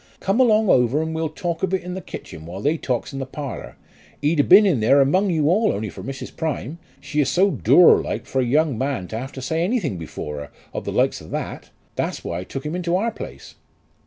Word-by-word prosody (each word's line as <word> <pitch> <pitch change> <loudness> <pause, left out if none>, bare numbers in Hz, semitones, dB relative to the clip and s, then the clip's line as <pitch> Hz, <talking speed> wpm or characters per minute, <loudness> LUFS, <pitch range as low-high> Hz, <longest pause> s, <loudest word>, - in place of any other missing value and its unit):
Come 195 +5 0
along 220 -4 +4
over 125 -2 +3
and 160 0 -4
we'll 160 0 -1
talk 165 +1 -4
of 190 0 +1
it 190 - -4
in 180 0 -5
the 190 - -5
kitchen 80 - -9
while 90 +3 -7
they 145 +9 +1
talks 130 -3 -3
in 135 - -4
the 135 - -3
parlour. 140 0 -7 0.4
He'd 150 +2 +1
a' - - +6
been 200 +7 +7
in 175 - +2
there 115 +6 +4
among 185 +9 +3
you 155 -4 +1
all 210 +7 +3
only 105 0 -3
for - - -9
Mrs. 135 -1 -7
Prime. 155 0 -3 0.2
She 150 +2 -1
is 140 - +1
so 195 +2 +3
dour 180 -1 +6
like - - -4
for 135 - 0
a - - +2
young 140 0 +1
man 130 -9 -2
to 110 - -4
have 135 +3 -6
to 130 - -7
say 160 +5 0
anything 175 - -1
before 75 -2 -6
her, 75 0 -8 0.2
of - - -5
the - - -2
likes - - +1
of - - -12
that. - - -5 0.3
That's - - -2
why 85 - -3
I - - -5
took 135 +7 -6
him 155 +3 -3
into 175 -1 -1
our 225 +5 +1
place." - - -9
150 Hz, 250 wpm, -22 LUFS, 130-180 Hz, 0.4 s, been